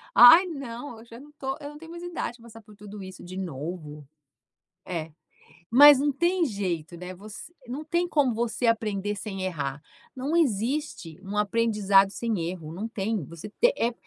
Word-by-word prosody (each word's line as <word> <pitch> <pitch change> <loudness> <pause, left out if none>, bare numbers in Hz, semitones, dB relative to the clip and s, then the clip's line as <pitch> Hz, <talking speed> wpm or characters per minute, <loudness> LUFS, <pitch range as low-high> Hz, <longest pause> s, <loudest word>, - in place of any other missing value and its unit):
"Ai, 245 +10 +10
não, 270 -6 -7
eu 225 - -14
já 230 0 -12
não 290 +3 -14
estou, 270 -2 -5
eu 285 - -7
não 295 - -11
tenho 325 +2 -12
mais 345 0 -8
idade 345 -8 -4
para 230 - -19
passar 225 -1 -13
por 210 -1 -17
tudo 205 0 -10
isso 185 -1 -10
de 185 +1 -8
novo." 155 -3 -6 0.8
É, 165 -3 -4 0.6
mas 285 +3 +9
não 290 0 +1
tem 345 +4 +1
jeito, 180 - -3
né, 180 +2 -7
você 210 - -11 0.2
não 265 +5 -5
tem 345 +3 0
como 285 -7 +2
você 235 +1 -1
aprender 210 -3 0
sem 195 -2 -5
errar. 145 -6 -3 0.3
Não 270 +4 -3
existe 245 - -1
um 200 +1 -7
aprendizado 210 -2 +3
sem 200 -6 -2
erro, 165 -4 -7
não 205 +6 -4
tem 220 -1 -2
você 170 +7 -9
te 485 - +2
eh, 235 +1 +1
220 Hz, 185 wpm, -26 LUFS, 185-275 Hz, 0.8 s, Ai